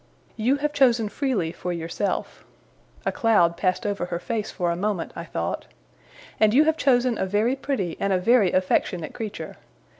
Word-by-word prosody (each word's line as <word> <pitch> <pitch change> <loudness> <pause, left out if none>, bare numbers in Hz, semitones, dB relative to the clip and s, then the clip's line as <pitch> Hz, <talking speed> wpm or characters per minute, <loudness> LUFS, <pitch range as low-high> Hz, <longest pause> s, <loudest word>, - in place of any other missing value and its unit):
You 240 +5 +2
have 295 +1 -2
chosen 240 -6 +3
freely 220 - -1
for 180 - -5
yourself'; 170 +4 -3 0.6
a - - +1
cloud 205 -7 +3
passed 185 +5 0
over 200 -3 -1
her 175 - -3
face 220 +3 -3
for 175 -2 -1
a - - -1
moment, 195 -1 -2
I 170 - -6
thought; 85 - -3 0.7
'and 215 +1 +4
you 295 - +7
have 315 0 +2
chosen 250 -6 +2
a 190 - 0
very 215 +6 +1
pretty 260 - -3
and 200 - 0
a 190 - +3
very 205 0 +4
affectionate 180 -3 0
creature. 200 -8 -6
205 Hz, 175 wpm, -24 LUFS, 175-245 Hz, 0.7 s, you